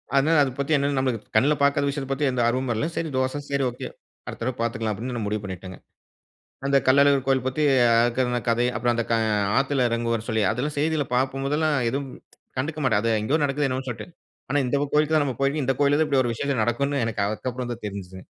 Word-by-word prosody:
அதனால 150 +4 +4
அது 130 - -1
பத்தி 140 +2 -2
என்ன 140 0 0
நம்மளுக்கு 125 -5 -2
கண்ணுல 135 +7 +4
பாக்காத 140 0 +3
விஷயத்தப் 140 -1 -3
பத்தி 145 +2 -1
எந்த 125 - -1
ஆர்வமும் 130 +1 0
இல்ல. 110 - -1
"சரி 165 - -2
தோச, 130 +2 0
சரி 140 -1 0
ஓகே. 120 - -7 0.4
அடுத்த - - -7
தடவ 130 0 -2
பாத்துக்கலாம்" 110 -2 -1
அப்டின்னு 120 +5 -5
நான் 110 - -3
முடிவு 105 0 -2
பண்ணிட்டேங்க. 95 -1 -7 0.9
அந்தக் 140 0 +2
கள்ளழகர் 140 0 +5
கோயில் 135 -2 +2
பத்தி 130 +4 -1 0.2
அ - - +4 0.2
இருக்குற 125 0 0
கதை, 120 +1 +2
அப்புறம் 120 +1 +1
அந்த 115 0 -1 0.5
ஆத்துல 135 -2 +1
எறங்குவார்னு 115 -1 -2
சொல்லி, 110 -2 +1
அதெல்லாம் 135 +7 -2
செய்திள்ல 150 -2 0
பார்க்கும் 135 +2 0
போதெல்லாம் 150 +1 +1
எதும், 140 +1 -3 0.5
கண்டுக்க 155 +4 -3
மாட்டேன். 110 -6 +3
அது 115 - +1
எங்கயோ 140 +9 0
நடக்குது 145 +1 0
என்னமோன்னு 130 +1 -3
சொல்ட்டு. 110 -3 -6 0.4
ஆனா 145 - +2
"இந்தக் 140 +2 -1
கோயிலுக்குதான் 150 0 +3
நாம 130 -4 -3
போயிருக்கோம். 140 +1 +1
இந்தக் 135 +1 -1
கோயில்லதான் 145 +2 +3
இப்டி 140 -2 +3
ஒரு 120 -2 -1
விசேஷம் 135 -1 -1
நடக்கும்னு" 140 +4 0
எனக்கு 110 -2 -2 0.3
அப்புறம்தான் 120 -2 -6
தெரிஞ்சதுங்க. 95 -2 -8
130 Hz, 200 wpm, -24 LUFS, 115-140 Hz, 0.9 s, கள்ளழகர்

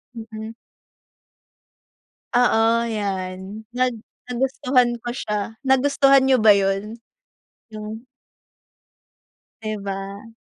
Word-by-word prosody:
Mm. 220 -1 -7 1.8
Oo 230 -1 +3
yan. 195 0 -4
Nag 255 0 +2 0.4
nagustuhan 250 -1 +1
ko 240 - -3
siya. 215 -2 -4
Nagustuhan 275 0 +5
niyo 265 -2 +4
ba 215 -2 +7
yun? 195 +3 0 0.7
Yung 215 +3 -8 1.5
'Di 215 -1 -3
ba? 200 +2 -6
220 Hz, 80 wpm, -22 LUFS, 205-245 Hz, 1.8 s, ba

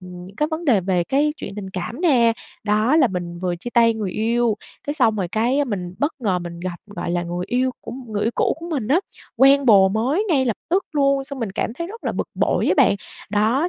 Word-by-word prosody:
những 180 +1 -11
cái 300 +1 +1
vấn 320 +2 -3
đề 235 - +4
về 180 -1 0
cái 290 - +1
chuyện - - -7
tình 190 -2 -6
cảm 190 - -5
nè, 250 -10 +4 0.3
đó 215 +7 +3
là 290 -5 +5
mình 175 -3 -5
vừa 180 -1 -2
chia 240 +8 -7
tay 230 -1 +4
người 210 -4 -3
yêu, 230 +1 +1 0.3
cái 290 - -1
xong 220 -8 +3
rồi 185 -3 -2
cái 250 +6 +2
mình 185 -7 -4
bất 290 +3 0
ngờ 195 -6 +1
mình 170 -1 -7
gặp, 180 -1 -4
gọi 195 -4 -5
là, 175 0 0
người 175 +1 -4
yêu 255 +2 +1
của - - -8
m 245 -3 -9
người 205 0 -1
yêu 230 - +2
cũ - - +1
của 340 - -7
mình 270 -10 -2
á, 305 +7 +4 0.4
quen 275 0 +5
bồ 195 -4 +7
mới 255 - 0
ngay 275 -6 +3
lập 235 -5 -1
tức 370 +2 +2
luôn, 275 -2 +2
xong 280 0 -8
mình 225 -5 -3
cảm 225 - -2
thấy 335 +3 -4
rất 450 +5 -10
là - - -1
bực - - -3
bội - - +1
á - - +4
bạn. - - +5 0.3
Đó, 225 +11 +2
230 Hz, 250 wpm, -21 LUFS, 190-275 Hz, 0.4 s, bồ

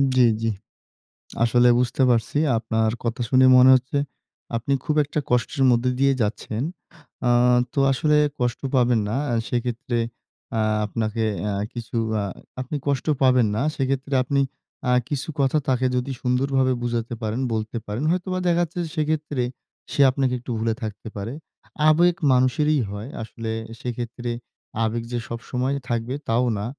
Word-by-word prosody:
জি, 130 - +5 0.2
জি। 115 - +1 0.9
আসলে 120 +1 +4
বুঝতে 125 +2 +1
পারছি। 120 +4 +1 0.2
আপনার 110 -1 0
কথা 115 +1 -2
শুনে 130 0 +5
মনে 130 +1 +8
হচ্ছে 130 +3 -1 0.6
আপনি 120 +4 0
খুব 150 - -1
একটা 150 +2 -3
কষ্টের 125 +3 +1
মধ্যে 120 +1 +2
দিয়ে 140 0 +4
যাচ্ছেন। 110 +2 -2 0.6
আ - - +4 0.4
তো 140 - 0
আসলে 150 +3 +2 0.2
কষ্ট 120 -1 -1
পাবেন 120 -2 +3
না। 115 - -1 0.3
সেক্ষেত্রে 120 0 -2 0.6
আ - - +1 0.3
আপনাকে 110 +1 -2 0.3
আ - - -2 0.2
কিছু 120 -1 -7 0.3
আ - - -1 0.4
আপনি 130 +4 -5
কষ্ট 140 -3 0 0.2
পাবেন 125 -4 +5
না। 115 - 0
সেক্ষেত্রে 135 +1 -1
আপনি 140 +1 +1 0.5
আ - - +4 0.2
কিছু 145 +2 -3
কথা 135 +2 +3
তাকে 130 -1 +1
যদি 125 +2 -1
সুন্দরভাবে 130 +1 +1
বুঝাতে 120 -1 -2
পারেন, 110 +3 -2
বলতে 110 +1 -3
পারেন। 105 +7 -4
হয়তোবা 185 +1 -1
দেখা 175 0 +3
যাচ্ছে 170 +1 -5 0.2
সেক্ষেত্রে 150 -4 -1 0.5
সে 140 - +1
আপনাকে 130 -1 0
একটু 125 0 -7
ভুলে 115 0 +1
থাকতে 110 0 -6
পারে। 105 +5 -4 0.6
আবেগ 170 +2 +4 0.2
মানুষেরই 145 +4 +3
হয়। 105 +5 -6
আসলে 115 0 -5 0.3
সেক্ষেত্রে 120 0 -4 0.5
আবেগ 115 +1 -1
যে 120 - -1
সবসময় 125 +3 -2 0.2
থাকবে, 120 +3 -1
তাও 120 +2 +3
না। 105 - -3
125 Hz, 150 wpm, -23 LUFS, 115-135 Hz, 0.9 s, মনে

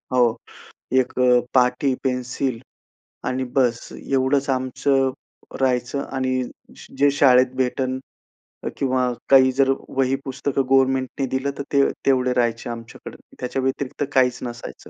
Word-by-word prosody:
हो. 120 -2 +4 0.6
1 130 -1 +2
अ, 125 -1 +5
पाटी, 125 +1 +3
पेन्सिल, 125 -1 -2 0.7
आणि 130 +1 -1
बस 120 -3 +1
एवढंच 135 +1 0
आमचं 135 +1 +1 0.5
राहायचं 130 +1 0
आणि 130 -1 0 0.6
जे 145 +1 +5
शाळेत 130 -2 +4
भेटेल 130 0 -1 0.8
किंवा 130 -2 +1 0.2
काही 130 -1 +7
जर 135 +1 +2 0.2
वही 135 0 +1
पुस्तकं 135 +1 -1
गव्हर्नमेंटनी 135 0 +2
दिलं 130 +2 -1
तर - - -3
ते 140 0 +5 0.2
तेवढे 130 -2 +2
राहायचे 120 -1 0
आमच्याकडे. 115 0 -9 0.2
त्याच्या 130 +1 -2
व्यतिरिक्त 135 +1 -2
काहीच 125 -2 +3
नसायचं. 120 -1 -8
130 Hz, 120 wpm, -22 LUFS, 125-135 Hz, 0.8 s, काही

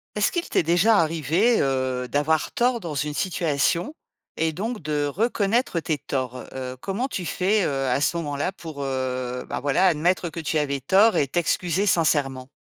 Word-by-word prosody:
Est-ce 210 - +2
qu'il 345 -1 -2
t'est - - +2
déjà 175 +7 +4
arrivé, 165 - +2
heu, 130 -2 -1
d'avoir 150 +4 0
tort 240 0 +1
dans 170 -7 -6
une 150 +1 -2
situation 170 - 0 0.4
et 160 0 0
donc 220 +7 -3
de 150 -1 0
reconnaître 215 - 0
tes 155 -2 -1
torts? 130 -2 -4
Heu, 130 -1 -6
comment 200 - -2
tu 185 -9 -4
fais, 195 +5 +1
heu, 135 -3 -1
à 125 - +1
ce 155 +4 +1
moment-là 145 +1 -2
pour, 160 -6 -8
heu, 130 -2 -3
ben, - - -2
voilà 145 +7 +2
admettre 175 +1 +1
que 165 - -7
tu 155 0 0
avais 140 -2 -1
tort 200 - +4
et 140 - +2
t'excuser 175 +5 0
sincèrement? 145 -7 +1
160 Hz, 175 wpm, -24 LUFS, 140-190 Hz, 0.4 s, déjà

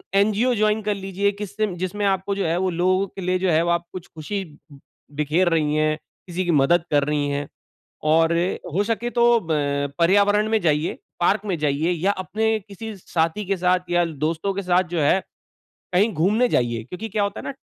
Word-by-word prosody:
NGO 215 +5 +3
join 215 0 +2
कर 210 0 0
लीजिए 195 +1 -1
किस 205 -1 -6
जिसमें 185 0 -1
आपको 195 0 0
जो 200 - -1
है 165 +1 +1
वो 190 - +1
लोगों 185 +3 +1
के 195 - -10
लिए 180 +1 0
जो 185 0 +1
है 165 +2 +2
आप 170 0 0
कुछ 185 -2 -8
ख़ुशी 195 +6 -5 0.7
बिखेर 155 +5 +2
रही 150 -2 +1
है, 155 0 +2 0.3
किसी 180 +1 -3
की 175 - +1
मदद 160 +3 +3
कर 145 -1 +3
रही 150 -1 0
है 145 0 -2 0.6
और 160 +2 +3 0.4
हो 200 - +2
सके 230 +1 -1
तो 235 0 +4
ब 145 -2 0
पर्यावरण 205 +4 +4
में 220 -1 +2
जाइए, 155 0 0 0.2
पार्क 195 +4 +2
में 190 -4 -1
जाइए 150 +3 +1
या 180 +4 +1
अपने 220 +4 -1
किसी 215 +2 -8
साथी 170 +3 -1
के 195 +1 -1
साथ 180 0 +1
या 175 0 +3 0.2
दोस्तों 165 +5 -1
के 200 - -3
साथ 180 0 +2
जो 165 - +1
है 145 +6 +3 0.7
कहीं 205 +5 +3
घूमने 210 +10 +2
जाइए, 120 - 0
क्योंकि 180 - -7
क्या 210 0 -1
होता 200 +1 -2
है - - -10
ना 275 - -4
185 Hz, 195 wpm, -23 LUFS, 160-205 Hz, 0.7 s, तो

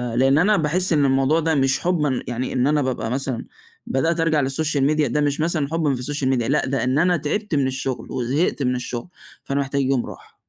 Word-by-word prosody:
لأن 135 +3 +3
أنا 205 +6 +4
باحس 170 +4 +1
إن 145 -2 +3
الموضوع 135 +4 +2
ده 160 0 0
مش 135 -1 +2
حبًا 150 -7 0
يعني 125 +1 -3
إن 125 0 +1
أنا 150 0 +2
بابقى 130 -4 -2
مثلًا 130 -2 -2 0.4
بدأت 160 +6 0
أرجع 160 -3 +2
للSocial 145 +2 0
Media 155 0 +2
ده 135 +5 0
مش 145 0 0
مثلًا 155 -3 0
حبًا 160 -4 +1
في 125 - -6
الSocial 145 +1 -2
Media 120 - 0
لأ 145 - +1
ده 135 +1 -1
إن 130 +2 +1
أنا 180 +1 +3
تعبت 170 +5 -2
من 140 -2 +2
الشغل، 130 -1 -4
وزهقت 135 +4 -1
من 125 0 +1
الشغل 125 +3 -5 0.3
فأنا 140 +1 -2
محتاج 140 0 -1
يوم 135 -2 0
راحة. - - -12
140 Hz, 220 wpm, -22 LUFS, 130-155 Hz, 0.4 s, أنا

